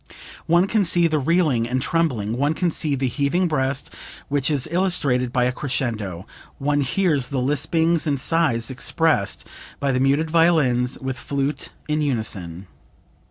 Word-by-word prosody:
One 175 +2 +4
can 210 +1 +1
see 175 -1 +3
the 155 -2 +1
reeling 140 -6 +1
and 130 +1 0
trembling, 125 -9 -1
one 145 +5 0
can 175 0 0
see 150 -2 0
the 135 0 -1
heaving 145 +8 0
breast 135 -3 -1 0.4
which 140 0 +1
is 145 -3 0
illustrated 145 -9 +1
by 125 0 +1
a 125 - +2
crescendo; 110 - -3 0.3
one 145 +1 0
hears 145 -2 +1
the 140 - -4
lispings 160 +5 +1
and 140 -2 0
sighs 130 -7 +1
expressed 130 -5 0 0.3
by 140 -1 0
the 125 - 0
muted 140 +4 +1
violins 145 -7 +2
with 130 0 -5
flute 140 0 -3 0.2
in 155 0 0
unison. 100 - -2
140 Hz, 155 wpm, -22 LUFS, 125-160 Hz, 0.4 s, One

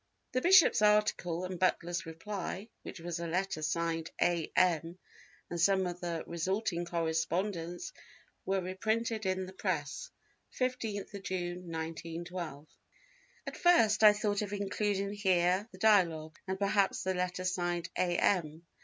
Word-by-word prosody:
The 255 - 0
bishop's 360 - +6
article 210 -5 +2
and 180 -1 -5
Butler's 175 -1 0
reply, 190 +4 -5
which - - -8
was 170 0 -4
a 170 - -3
letter 180 -1 -1
signed 165 +1 -1
A. 170 -2 +1
M. 170 -1 +2 0.5
and 170 -1 -3
some 190 +1 +4
of 175 0 -4
the 170 -2 -3
resulting 175 +1 -1
correspondence 170 - -2 0.5
were 195 0 0
reprinted 220 +4 -1
in 185 0 0
the 185 - -10
Press, - - -3 0.5
15th 220 -6 -2
June, 180 -2 -4
1912. 165 -1 -5 0.8
At - - -6
first 225 -12 +4
I 210 -1 +10
thought 210 -1 0
of 205 -1 -4
including 200 0 -1
here 190 0 +2
the 185 - -13
Dialogue, 170 -7 +3
and 190 0 -2
perhaps 200 0 +1
the 190 - 0
letter 180 0 -2
signed 175 -2 -1
A. 175 -1 +1
M. 165 -3 +1
185 Hz, 135 wpm, -32 LUFS, 170-205 Hz, 0.8 s, I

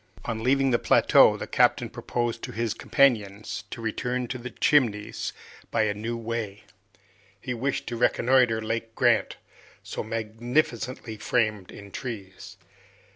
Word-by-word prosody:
On 110 -2 -3
leaving 135 +2 +3
the 120 - +3
plateau, - - +5
the - - -5
captain - - +2
proposed 120 -1 -3
to - - -6
his 115 -1 -1
companions 110 -7 +1
to 115 - -7
return 125 +3 -2
to 130 - -4
the 125 +1 -6
Chimneys 115 -6 +1 0.4
by 110 - +2
a 105 -1 +1
new 115 +3 -4
way. 115 -3 -4 0.8
He 125 +5 -4
wished 130 +3 -2
to 120 - -4
reconnoiter 120 -1 +3
Lake 115 0 -3
Grant, 120 -3 +2 0.5
so - - -5
magnificently 115 +2 -2
framed 105 -4 0
in 100 -1 -11
trees. 100 -7 -7
115 Hz, 135 wpm, -26 LUFS, 110-125 Hz, 0.8 s, plateau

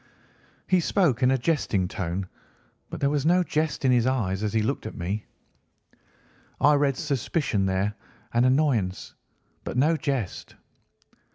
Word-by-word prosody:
He 185 - +3
spoke 160 - +1
in 125 - +4
a 135 - +3
jesting 120 - 0
tone, 90 +1 -4 0.6
but - - -6
there 140 - +3
was 145 -2 0
no 180 +3 +4
jest 155 -4 -1
in 130 - +5
his 120 -1 +3
eyes 105 -7 0
as 105 -1 -1
he 110 0 +1
looked 120 -1 -2
at - - -8
me. 95 +5 -3 1.3
I 150 +2 +5
read 140 -2 +2
suspicion 140 - -1
there 95 +2 0 0.4
and 120 +1 +3
annoyance, 130 -9 0 0.5
but - - -5
no 155 +6 +3
jest. 135 - -3
130 Hz, 150 wpm, -26 LUFS, 105-145 Hz, 1.3 s, in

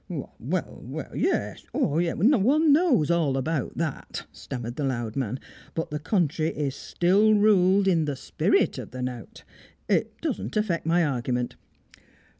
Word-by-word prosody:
"Well, - - -6 0.5
well - - -7
yes; - - -1
yes 165 +3 +1
one 280 - +4
knows 285 - +3
all 155 -6 +2
about 140 +1 -2
that," 160 -4 -4
stammered 120 -2 -6
the 145 - -3
loud 120 -5 -2
man. 130 -2 -2 0.4
"But 165 - -3
the 150 - -2
country 160 -2 0
is 145 -4 -2
still 200 +8 +3
ruled 200 -2 +4
in 165 -4 +3
the 145 -2 -2
spirit 130 - +1
of - - -7
the 130 0 -6
knout. 125 -4 -6 0.4
It - - 0
doesn't 105 - -3
affect 185 -7 0
my 170 0 +3
argument. 125 -3 -2
160 Hz, 145 wpm, -26 LUFS, 130-190 Hz, 0.5 s, one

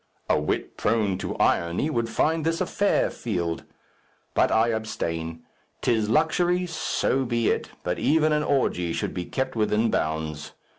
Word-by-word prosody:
A - - +3
wit 75 - -2
prone 105 -5 +1
to - - -4
irony 85 - +1
would 115 -4 -1
find 160 +7 +1
this 165 +1 0
a - - +1
fair 200 0 +1
field. 85 -7 -3 0.7
But - - +3
I 110 +1 +3
abstain. 85 -7 -3 0.4
'Tis 110 -3 +1
luxury; 175 +6 +2
so 160 -5 0
be 120 -2 +1
it, - - -1
but 90 0 -2
even 155 0 +3
an 150 - +2
orgy 90 - +1
should - - -2
be 90 - -3
kept 130 +5 -2
within 110 0 +2
bounds. 80 -1 -2
115 Hz, 155 wpm, -25 LUFS, -, 0.7 s, A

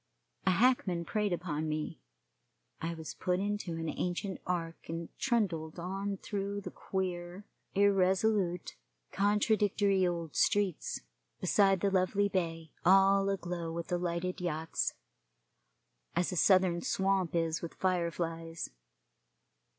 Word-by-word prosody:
A - - +7
hackman 190 -4 +3
preyed 210 +4 0
upon 160 -3 -2
me. 155 - -3 0.8
I 165 +1 -2
was 160 -1 -7
put 180 -1 0
into 205 -3 -2
an 165 0 -3
ancient 180 +4 -2
ark 165 -3 -3
and 165 0 -5
trundled 180 -11 0
on 195 +3 -3
through 200 0 -3
the - - -7
queer, 180 0 -4 0.3
irresolute, 195 -1 +2 0.3
contradictory 205 -1 +2
old 170 -3 -3
streets, 200 -5 +1 0.4
beside 195 0 +3
the 200 - +2
lovely 195 +2 +2
bay, 165 -4 -2
all 195 +2 +5
aglow 175 -3 -3
with 170 0 -5
the 175 - 0
lighted 175 +1 -2
yachts, 160 -2 -1 1.2
as 175 +2 +1
a - - -3
Southern 185 -1 +4
swamp 190 -3 +1
is 165 -1 0
with 170 - -6
fire 180 -2 +1
flies. 165 0 -4
180 Hz, 120 wpm, -32 LUFS, 170-195 Hz, 1.2 s, A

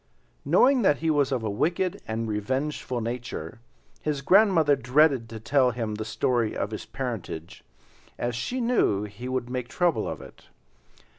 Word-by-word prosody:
Knowing 265 -1 +4
that 150 -9 +4
he 160 0 0
was 145 -2 +2
of 125 -4 -1
a 110 - -1
wicked 170 - 0
and 110 +1 -2
revengeful 130 +4 -2
nature, 115 -7 -5 0.4
his 145 -2 -2
grandmother 180 -4 +5
dreaded 135 -2 +3
to 110 0 -7
tell 130 +3 +3
him 115 -3 -3
the 105 +1 -4
story 110 +1 0
of 100 - -2
his 110 - -6
parentage, 110 -10 -6 0.5
as 120 0 -2
she 185 - -3
knew 230 - +2
he 120 +5 -7
would 130 -2 -2
make 125 -1 -3
trouble 175 +5 +1
of - - -4
it. - - -14
125 Hz, 160 wpm, -26 LUFS, 110-150 Hz, 0.5 s, grandmother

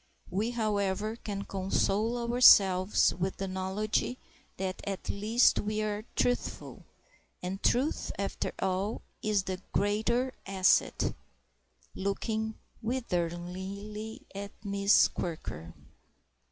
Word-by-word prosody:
We, 205 +5 0
however, 210 -2 0
can 205 -3 -5
console 195 +4 0 0.2
ourselves 195 -6 +6
with 185 +2 -2
the 195 - -3
knowledge 190 +3 -1 0.5
that 185 0 -3
at 195 -2 -4
least 220 +5 +3
we 215 +1 -1
are 210 0 -3
truthful; 245 0 -1 0.6
and 190 +2 -4
truth, 265 +6 +1
after 200 0 -2
all, 190 +3 -1 0.2
is 210 -2 +1
the 185 0 -4
greater 230 +5 +1
asset"—looking 200 +2 -1 0.3
witheringly 200 0 -3
at 200 +1 -5 0.2
Miss 200 0 +5
Quirker. 85 - -5
200 Hz, 95 wpm, -30 LUFS, 190-215 Hz, 0.6 s, ourselves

